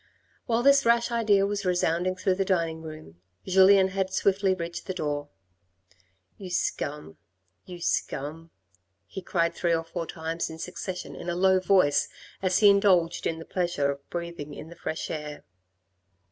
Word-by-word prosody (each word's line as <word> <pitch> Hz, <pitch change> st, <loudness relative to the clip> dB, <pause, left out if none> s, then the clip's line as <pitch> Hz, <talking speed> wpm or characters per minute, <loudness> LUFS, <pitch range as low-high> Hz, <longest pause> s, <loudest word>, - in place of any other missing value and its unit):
While 235 Hz, 0 st, +1 dB
this 280 Hz, +1 st, +6 dB
rash 235 Hz, +1 st, +3 dB
idea 210 Hz, -4 st, +3 dB
was 200 Hz, 0 st, -2 dB
resounding 180 Hz, 0 st, +1 dB
through 185 Hz, +1 st, +1 dB
the 195 Hz, +1 st, 0 dB
dining 165 Hz, -4 st, -1 dB
room 155 Hz, -, -11 dB, 0.2 s
Julien 190 Hz, +1 st, +6 dB
had 190 Hz, 0 st, -2 dB
swiftly 195 Hz, 0 st, +2 dB
reached 170 Hz, +1 st, -6 dB
the 185 Hz, -, -2 dB
front -, -, -5 dB
door. 145 Hz, -2 st, -3 dB, 1.1 s
"You 190 Hz, -2 st, -7 dB
scum, 150 Hz, -, -3 dB, 0.5 s
you 180 Hz, -1 st, -8 dB
scum," 155 Hz, +2 st, -2 dB, 0.6 s
he 190 Hz, -, -8 dB
cried, 170 Hz, -3 st, 0 dB
three 170 Hz, -1 st, +1 dB
or 165 Hz, -, -2 dB
four 165 Hz, 0 st, -5 dB
times 165 Hz, +1 st, -4 dB
in 160 Hz, -, -8 dB
succession 180 Hz, +2 st, -6 dB
in 175 Hz, -, -6 dB
a 170 Hz, -, -1 dB
low 190 Hz, +1 st, +4 dB
voice 185 Hz, -6 st, +3 dB, 0.3 s
as 185 Hz, -1 st, +2 dB
he 205 Hz, -, +7 dB
indulged 185 Hz, -4 st, +3 dB
in 165 Hz, -, -2 dB
the 165 Hz, -, -9 dB
pleasure 175 Hz, -6 st, 0 dB
of 140 Hz, 0 st, -10 dB
breathing 170 Hz, -4 st, -6 dB
in 160 Hz, -, -9 dB
the 170 Hz, -, -11 dB
fresh 160 Hz, -, -4 dB
air. 150 Hz, -1 st, -6 dB
175 Hz, 165 wpm, -27 LUFS, 160-190 Hz, 1.1 s, he